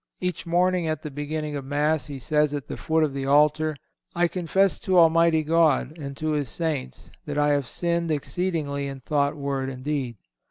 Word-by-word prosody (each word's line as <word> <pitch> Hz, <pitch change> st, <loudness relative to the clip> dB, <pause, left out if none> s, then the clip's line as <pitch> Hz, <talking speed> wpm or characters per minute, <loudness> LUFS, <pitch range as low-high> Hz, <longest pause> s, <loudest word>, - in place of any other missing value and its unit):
Each 180 Hz, -1 st, -3 dB
morning, 180 Hz, 0 st, +2 dB
at 155 Hz, -1 st, -2 dB
the 150 Hz, -, -5 dB
beginning 150 Hz, +1 st, -4 dB
of 140 Hz, -, -4 dB
Mass, 150 Hz, +3 st, 0 dB
he 140 Hz, -2 st, -6 dB
says 150 Hz, +2 st, +1 dB
at 145 Hz, -, -5 dB
the -, -, -5 dB
foot 160 Hz, 0 st, +1 dB
of 150 Hz, -3 st, 0 dB
the 135 Hz, 0 st, -3 dB
altar, 150 Hz, +2 st, +3 dB, 0.4 s
"I 175 Hz, 0 st, +3 dB
confess 185 Hz, +2 st, +1 dB
to 185 Hz, -1 st, +1 dB
Almighty 165 Hz, -1 st, +5 dB
God, 160 Hz, -2 st, +2 dB
and 140 Hz, -4 st, -7 dB
to 155 Hz, 0 st, -1 dB
His 145 Hz, -4 st, -1 dB
Saints, 155 Hz, -4 st, -4 dB, 0.2 s
that 145 Hz, 0 st, -3 dB
I 145 Hz, 0 st, +3 dB
have 145 Hz, -3 st, +1 dB
sinned 170 Hz, +2 st, -1 dB
exceedingly 150 Hz, -2 st, -2 dB
in 135 Hz, -1 st, -7 dB
thought, 145 Hz, +2 st, 0 dB
word 140 Hz, -2 st, -2 dB
and 130 Hz, -1 st, -8 dB
deed." 135 Hz, -6 st, -2 dB
150 Hz, 195 wpm, -25 LUFS, 140-165 Hz, 0.4 s, Almighty